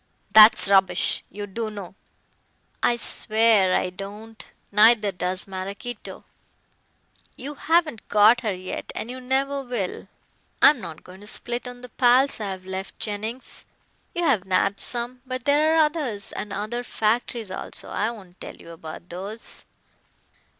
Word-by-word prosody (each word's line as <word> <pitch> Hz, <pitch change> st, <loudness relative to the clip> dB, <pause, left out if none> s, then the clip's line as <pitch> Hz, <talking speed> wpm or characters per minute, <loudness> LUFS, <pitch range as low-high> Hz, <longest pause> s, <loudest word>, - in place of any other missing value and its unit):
"That's 215 Hz, -1 st, +9 dB
rubbish. 195 Hz, -1 st, +2 dB
You 205 Hz, +1 st, -6 dB
do 220 Hz, +3 st, -4 dB
know." 200 Hz, -4 st, -8 dB, 0.9 s
"I 240 Hz, -, +3 dB
swear 215 Hz, -5 st, +3 dB
I 180 Hz, -, 0 dB
don't. 205 Hz, +4 st, -9 dB, 0.3 s
Neither 210 Hz, 0 st, +5 dB
does 180 Hz, 0 st, 0 dB
Maraquito. 195 Hz, +5 st, -7 dB, 1.1 s
You 280 Hz, +4 st, -7 dB
haven't 320 Hz, -5 st, 0 dB
caught 215 Hz, +3 st, +5 dB
her 220 Hz, -3 st, -1 dB
yet 185 Hz, 0 st, -6 dB
and 235 Hz, -, -4 dB
you 255 Hz, 0 st, -8 dB
never 275 Hz, +2 st, 0 dB
will. 240 Hz, -8 st, -4 dB, 0.5 s
I'm 290 Hz, -6 st, +6 dB
not 160 Hz, -1 st, -8 dB
going 185 Hz, +2 st, -14 dB
to 205 Hz, -, -12 dB
split 240 Hz, +3 st, -1 dB
on 245 Hz, 0 st, -9 dB
the 250 Hz, -, -10 dB
pals 255 Hz, +2 st, +3 dB
I 210 Hz, -2 st, -3 dB
have 185 Hz, -1 st, -7 dB
left, 190 Hz, +1 st, -6 dB
Jennings. 220 Hz, +4 st, -5 dB, 0.5 s
You 345 Hz, -, -1 dB
have 265 Hz, -, +2 dB
nabbed 195 Hz, +1 st, +1 dB
some, 245 Hz, +1 st, -1 dB
but 255 Hz, 0 st, -6 dB
there 300 Hz, +2 st, +3 dB
are 320 Hz, -1 st, +6 dB
others, 280 Hz, -10 st, -4 dB
and 210 Hz, -, -6 dB
other 215 Hz, +5 st, -3 dB
factories 225 Hz, -2 st, -1 dB
also. -, -, -1 dB
I 215 Hz, -, 0 dB
won't 190 Hz, -6 st, -12 dB
tell -, -, -8 dB
you 170 Hz, -, -13 dB
about 160 Hz, +1 st, -10 dB
those." 195 Hz, +6 st, -7 dB
220 Hz, 150 wpm, -24 LUFS, 195-245 Hz, 1.1 s, That's